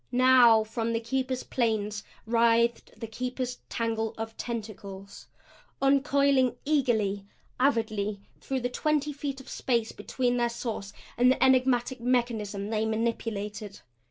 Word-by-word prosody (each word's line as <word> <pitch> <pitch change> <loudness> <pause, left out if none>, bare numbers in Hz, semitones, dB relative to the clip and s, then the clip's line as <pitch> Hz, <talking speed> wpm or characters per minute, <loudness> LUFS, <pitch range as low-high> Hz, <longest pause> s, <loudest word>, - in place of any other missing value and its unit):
Now 245 -3 +6
from 225 +1 -3
the 230 - +1
Keeper's 255 +2 -2
planes 215 -3 -1 0.2
writhed 235 +1 +2
the - - -4
Keeper's 250 +2 -4
tangle 225 -1 -2
of 225 0 -5
tentacles, 205 -4 -7 0.5
uncoiling 275 -1 +3
eagerly, 220 -9 +1 0.3
avidly, 215 -6 0 0.2
through 265 -1 -3
the 245 - -1
twenty 300 +2 0
feet 280 -1 -4
of 265 - -13
space 235 -3 -1
between 245 -1 -1
their 240 -1 +1
source 230 -4 -5 0.3
and 250 +1 +6
the - - +1
enigmatic 255 -1 +2
mechanism 225 -5 -1
they 220 -1 0
manipulated. 215 -2 -3
235 Hz, 125 wpm, -28 LUFS, 220-255 Hz, 0.5 s, Now